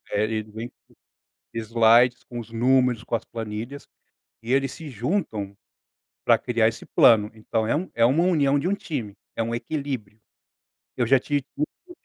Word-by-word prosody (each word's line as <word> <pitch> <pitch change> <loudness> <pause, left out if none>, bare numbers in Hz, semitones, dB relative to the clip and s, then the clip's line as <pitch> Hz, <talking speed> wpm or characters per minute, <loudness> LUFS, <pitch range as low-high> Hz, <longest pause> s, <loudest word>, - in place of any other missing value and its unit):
é 105 - +2
eles 110 -1 -3
vêm 115 +3 -6 0.8
slides, 115 +2 +4
com 120 - -8
os 115 - -11
números, 125 0 +2
com - - -3
as 115 - -1
planilhas, 115 +5 -6 0.6
e 115 - -5
eles 135 -1 +2
se 160 -3 -9
juntam 115 - -2 0.7
pra - - +5
criar 115 -3 +2
esse 115 - -7
plano. 105 -2 +5
Então, 110 0 -2
é - - +1
um 180 +5 -3
é 115 - +3
uma 145 +9 +4
união 145 -6 +3
de 160 - -1
um 200 - +2
time, 125 - -5 0.2
é 115 - -1
um 115 +1 -2
equilíbrio. 120 -6 -4 0.8
Eu 120 - +1
já 135 +2 +5
tive 145 +1 -2
muito 340 - -6
120 Hz, 170 wpm, -24 LUFS, 110-140 Hz, 0.8 s, pra